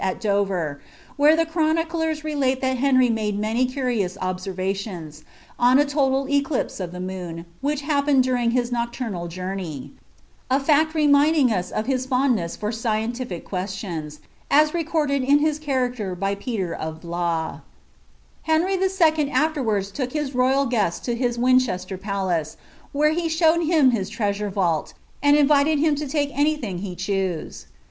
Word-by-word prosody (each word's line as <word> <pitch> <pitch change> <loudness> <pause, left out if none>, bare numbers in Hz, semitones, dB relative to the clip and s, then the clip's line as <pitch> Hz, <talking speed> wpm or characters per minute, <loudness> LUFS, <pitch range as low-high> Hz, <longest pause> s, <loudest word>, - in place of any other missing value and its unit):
at 190 -1 -1
Dover, 195 -9 -1 0.3
where 295 +2 +5
the 330 0 +2
cfarth 320 -1 +1
nicjers 320 -2 -2
relate 275 -4 0
that 260 -1 0
Henry 255 -1 +4
made 210 -2 -1
many 225 +4 +1
curious 245 -8 -2
observations, 185 -3 -4 0.4
on 245 +2 +5
■ 290 +1 +3
toul 275 -1 +1
eclipae 280 -3 -1
of 180 -2 -4
the 180 - -8
moon, 180 -3 -6 0.2
which 295 +1 -1
happened 285 -2 +2
during 250 -2 +1
his 245 0 0
nocturnal 235 -7 -3
joutney,— 180 -4 -5 0.6
I 260 - +3
&CI 300 +2 +3
reminding 295 -2 +4
us 180 -4 -1
of 215 - -2
hia 260 0 0
fondness 250 -8 0
for 210 +1 -2
scientific 225 -3 -3
questions, 180 -6 -5 0.3
as 300 +1 +5
rvcordad 310 -4 0
i> 275 +3 +4
hia 305 0 0
character 250 -9 -2
by 195 +2 -1
Peter 200 -4 -3
of 160 0 -6
Blois. 170 -1 -2 0.8
Henry 325 +4 +1
il. 380 - 0
aKerwards 300 - +1
took 255 0 -3
hia 300 -2 -1
royal 260 +2 +2
^est 210 -9 0
to 240 - -1
his 240 0 -1
Wincbeater 235 -7 +1
Palan. 190 -6 -2 0.4
where 300 +2 +2
he 330 +1 -1
showed 325 +1 +3
him 310 -5 +4
his 200 -5 -2
treasure 210 -1 -2
van! 180 -5 +1
U - - -16 0.3
and 285 +1 +5
invited 295 +1 +4
him 305 +1 +3
to 295 +1 -3
t^e 285 0 -1
ay 295 +2 +2
thing 205 -11 -5
he 185 -2 -5
chose. 190 -3 -3
245 Hz, 155 wpm, -23 LUFS, 190-290 Hz, 0.8 s, where